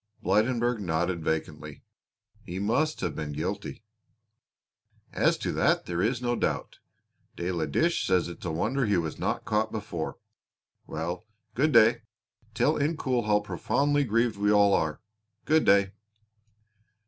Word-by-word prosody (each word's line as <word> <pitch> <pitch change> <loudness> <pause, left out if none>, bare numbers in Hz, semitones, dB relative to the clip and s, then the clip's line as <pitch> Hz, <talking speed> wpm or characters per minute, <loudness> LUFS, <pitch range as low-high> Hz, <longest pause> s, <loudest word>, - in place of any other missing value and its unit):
Blydenburg 115 +4 +1
nodded 85 -2 -1
vacantly. 80 0 -4 0.6
"He 90 - -6
must 125 +11 0
have 85 -5 -2
been 75 -1 -4
guilty." 100 +8 -4 1.3
"As - - +2
to - - -3
that - - +1
there 85 0 -2
is 120 +4 0
no 120 0 +1
doubt. - - -2 0.6
De 85 +2 -3
la 85 -3 -1
Dèche 170 +1 +1
says 90 -2 +2
it 85 - -9
is - - -10
a 85 - -1
wonder 115 +10 0
he 100 -2 +2
was 80 -3 -3
not - - -2
caught 110 +1 0
before. 85 -6 -5 0.7
Well, 85 +7 -4 0.3
good 150 +7 +2
day; 115 -1 +5 0.5
tell 150 +6 +2
Incoul 135 -6 0
how 105 -1 +3
profoundly 145 +7 0
grieved 115 -2 +1
we 105 +1 +2
all 100 -1 +5
are. 80 0 0 0.4
Good 155 0 +3
day." 100 -1 +4
105 Hz, 145 wpm, -27 LUFS, 85-120 Hz, 1.3 s, day